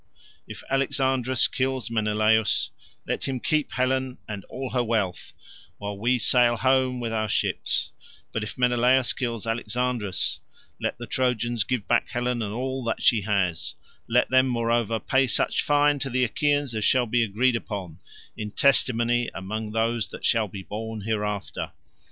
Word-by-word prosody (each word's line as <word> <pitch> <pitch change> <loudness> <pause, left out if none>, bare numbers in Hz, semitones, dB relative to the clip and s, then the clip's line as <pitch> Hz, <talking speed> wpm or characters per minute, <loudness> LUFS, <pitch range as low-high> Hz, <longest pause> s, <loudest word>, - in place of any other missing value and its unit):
If - - -9
Alexandrus 130 -2 +2
kills 130 -3 -2
Menelaus, 110 0 +2 0.3
let - - -2
him 130 -2 -2
keep 155 +2 0
Helen 130 0 0
and 105 -3 -6
all 130 0 -6
her 125 -1 +1
wealth, 110 -6 -1 0.5
while 100 0 -5
we 120 +5 +1
sail 120 0 +4
home 130 0 +2
with 115 -2 -3
our 110 -1 -1
ships; - - 0 0.4
but 115 - -2
if 105 - -6
Menelaus 125 0 +3
kills 115 -4 -3
Alexandrus, 115 - -1 0.4
let - - -2
the 120 - -7
Trojans 120 -3 0
give 120 -2 -2
back - - +2
Helen 120 0 -1
and 105 -2 -3
all 130 +3 -3
that 115 - -2
she 115 -4 +5
has; 95 -5 -1 0.3
let 120 +2 +3
them 130 0 +5
moreover 115 -2 0
pay 130 +3 +2
such - - +2
fine 145 0 +3
to 135 0 -3
the 130 0 +1
Achaeans 145 +1 +1
as 110 -1 -2
shall 125 +4 +4
be 120 +1 +2
agreed 115 +4 +1
upon, 95 -7 -5 0.4
in 105 - -5
testimony 120 -1 +3
among 105 +3 -4
those 115 -1 0
that - - -7
shall 115 -3 +3
be 95 0 -8
born 110 +2 -6
hereafter. 105 -1 -3
120 Hz, 155 wpm, -25 LUFS, 110-130 Hz, 0.5 s, she